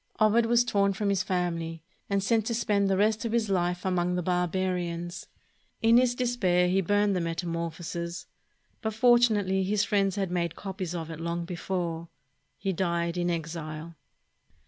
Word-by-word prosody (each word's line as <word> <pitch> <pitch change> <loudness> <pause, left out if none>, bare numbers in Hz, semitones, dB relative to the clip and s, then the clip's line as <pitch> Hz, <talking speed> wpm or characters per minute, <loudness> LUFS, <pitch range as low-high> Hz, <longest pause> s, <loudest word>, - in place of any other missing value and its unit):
Ovid 225 +2 +4
was 240 +1 +4
torn 200 -4 +2
from 205 +1 -1
his 195 -2 +2
family 170 -3 -2 0.3
and 200 -1 +1
sent 225 +1 +1
to 230 - 0
spend 205 -3 +1
the 190 - +2
rest 215 +3 +2
of 230 -1 -2
his 230 -3 +1
Hfe 180 -1 0
among 180 -1 +1
the 180 - -1
barbarians. 180 -1 -2 0.5
In 230 +1 +5
his 245 -1 +3
despair 200 -8 +2
he 190 +2 +2
burned 205 +2 +2
the 180 - 0
"Metamorphoses," 170 0 -4 0.6
but 220 -2 -3
fortunately 220 -5 +4
his 200 +2 +1
friends 200 -2 +1
had 195 -3 -2
made 170 -2 -1
copies 190 -3 -5
of 165 -1 -5
it 160 - -7
long 170 +1 -3
before. 170 -1 -3 0.5
He 195 0 -2
died 170 -1 -1
in 175 0 0
exile. 165 -1 -5
185 Hz, 165 wpm, -28 LUFS, 170-205 Hz, 0.6 s, In